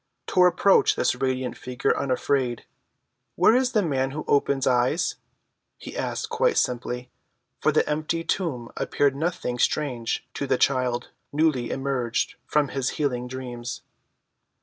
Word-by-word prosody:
Tor 180 0 +5
approached 180 +2 +4
this - - +2
radiant 130 -2 -2
figure 125 -1 -1
unafraid. 130 -2 0 0.7
"Where 225 - +5
is 255 0 +2
the 215 -3 +3
man 135 -5 0
who 150 +3 -5
opens 140 -1 +2
eyes?" 125 +7 +2 0.6
he - - -9
asked - - -2
quite 465 +2 +1
simply, 125 0 -1 0.5
for - - +3
the - - +2
empty 155 +2 -1
tomb 140 -11 -2
appeared 140 -2 +1
nothing 140 -5 -2
strange 125 -7 0
to 140 - -3
the 130 - +2
child 125 -3 +1 0.2
newly 145 -5 +1
emerged 135 -3 -1
from 150 -2 +2
his 135 -2 -1
healing 125 -5 -1
dreams. 125 -2 -6
135 Hz, 135 wpm, -25 LUFS, 125-155 Hz, 0.7 s, Tor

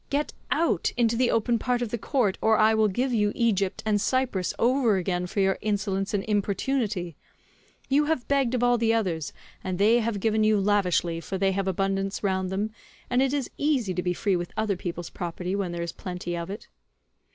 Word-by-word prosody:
Get 290 +1 -1 0.2
out, 305 - +1
into 235 -1 +2
the 245 +1 +2
open 230 +1 +1
part 245 0 0
of 235 - -3
the 235 - -2
court,145 215 -3 0
or 220 0 +4
I 220 +1 +5
will 220 -1 +3
give 245 +6 -1
you 210 -2 +2
Egypt 200 -5 0
and 210 -2 +2
Cyprus 250 -8 0
over 240 -4 +3
again 180 -1 -1
for 200 - -1
your 190 0 +2
insolence 200 -2 -1
and 195 - -1
importunity; 205 - -1 0.7
you 290 +2 +3
have 310 -5 -1
begged 270 -3 +2
of 245 - 0
all 245 -1 +3
the 225 0 +2
others, 170 -9 -1 0.3
and 185 -1 -3
they 220 +5 +4
have 225 -3 -1
given 220 +1 +1
you 215 -1 +4
lavishly, 185 -4 +1
for 190 - -4
they 195 0 +2
have 195 0 -1
abundance 195 +2 -1
round 190 -2 0
them, 205 +3 -2 0.4
and 250 +1 +3
it 270 -1 +2
is 280 -3 -2
easy 265 -10 +1
to 180 - -1
be 180 0 -1
free 200 0 +1
with 175 -1 -3
other 215 -2 +1
people's 175 -1 -5
property 180 +1 -4
when 195 -3 -2
there 170 0 -3
is 170 - -4
plenty 180 -2 -5
of 170 +1 -5
it." 205 +3 -7
205 Hz, 210 wpm, -26 LUFS, 190-235 Hz, 0.7 s, I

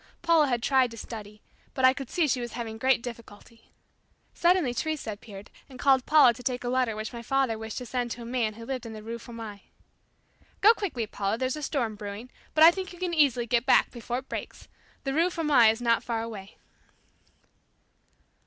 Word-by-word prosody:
Paula 330 -3 +4
had 240 -3 -1
tried 260 -2 +3
to 230 - -11
study, 210 -1 -9 0.3
but 260 - +3
I 260 - +7
could 270 -2 -7
see 340 -4 +1
she 255 -2 0
was 240 - -6
having 225 -2 -6
great 260 -1 +2
difficulty. 230 -1 -11 0.6
Suddenly 345 -7 +2
Teresa 305 -2 -3
appeared 205 -1 -11 0.2
and 260 - -12
called 265 -1 +3
Paula 300 -6 +6
to 235 - -12
take 250 0 -2
a 245 - -2
letter 250 -3 +1
which 215 +3 -5
my 235 - -6
father 265 -1 0
wished 220 0 -7
to 250 - -5
send 245 0 -2
to 235 0 -6
a - - -9
man 230 -3 -1
who 230 +1 -10
lived 255 -2 -4
in 225 - -8
the 215 -1 -9
Rue 230 +1 -6
Fourmi. 225 -4 -10 0.9
"Go 430 +3 +7
quickly, 340 - -3
Paula, 205 0 -2
there's 255 +2 -1
a 305 - -6
storm 260 -6 -1
brewing, 205 +3 -8 0.2
but 310 - +6
I 330 - +10
think 375 +1 -6
you 355 - -12
can 360 -1 -3
easily 275 -7 +3
get 240 +2 0
back - - +4
before 240 0 -4
it 260 +1 -7
breaks. - - -7 0.4
The 270 -2 -2
Rue 335 +5 +3
Fourmi 300 -10 +4
is 225 +2 -1
not 230 -1 +2
far 230 -2 -2
away." 210 -4 -9
245 Hz, 210 wpm, -27 LUFS, 225-270 Hz, 0.9 s, I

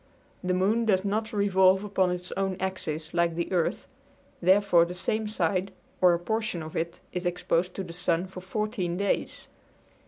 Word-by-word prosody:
The 180 0 +1
moon 210 +5 +2
does 195 -3 +2
not 215 +2 -1
revolve 190 -2 +4
upon 195 -3 +1
its 180 0 -3
own 195 -1 -1
axis 160 -4 -4
like 170 -1 +1
the 170 +2 -3
earth, 175 -3 0 0.6
therefore 185 -1 +5
the 175 +1 -4
same 215 +4 -1
side 190 -1 0 0.3
or 180 -2 +6
a - - -3
portion 220 -2 -2
of 155 - -9
it 170 +1 -3
is 180 0 -3
exposed 175 0 0
to 195 - -3
the 170 -2 -8
sun 175 0 0
for 185 -1 -9
14 190 -2 -2
days. 200 +1 -1
185 Hz, 175 wpm, -27 LUFS, 175-200 Hz, 0.6 s, or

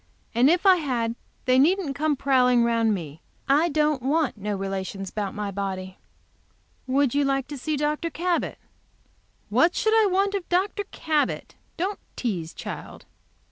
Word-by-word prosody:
"And 245 +4 +5
if 355 +4 +2
I 380 -2 +7
had 245 -7 -1 0.3
they 255 0 +4
needn't 335 0 +3
come 305 0 +1
prowling 250 -3 +3
around 230 -2 +2
me. 160 -4 -8 0.3
I 295 +5 +4
don't 300 -2 +1
want 290 +2 +1
no 205 0 -3
relations 195 0 -4
about 205 -1 -3
my 205 -1 -3
body." 190 -1 -5 0.9
"Would 270 -1 +2
you 285 0 +2
like 275 -1 0
to 290 - -6
see 305 +3 -2
Dr. 300 +3 -1
Cabot?" 345 +1 -1 0.9
"What 260 - +3
should 440 - +2
I 445 -2 +5
want 395 +1 +1
of 390 -3 -3
Dr. 395 +3 0
Cabot? 310 -2 -1 0.2
Don't 385 +4 -2 0.2
tease, 180 -9 -3
child." - - -8
275 Hz, 155 wpm, -25 LUFS, 215-330 Hz, 0.9 s, I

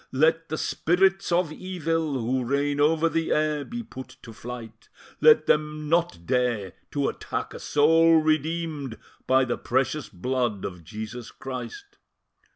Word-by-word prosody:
let 160 +4 +2
the 155 - -2
Spirits 190 +4 +1
of 170 -2 +2
Evil, 165 -3 -2
who 130 0 0
reign 140 +3 0
over 160 +2 +3
the 165 0 -1
air, 150 -1 +1
be 235 +8 -6
put 130 - -10
to 115 - -10
flight; 115 0 -9 0.3
let 460 -1 +6
them 150 0 +1
not 170 - +1
dare 120 -6 0 0.2
to 140 -1 0
attack - - -4
a - - -8
soul 165 +3 +4
redeemed 155 -4 0 0.3
by 130 0 +4
the 120 - -2
precious 135 +3 -1
blood 120 +1 -2
of 90 -3 -7
Jesus 110 +5 -7
Christ." 400 - -8
150 Hz, 145 wpm, -26 LUFS, 125-165 Hz, 0.3 s, let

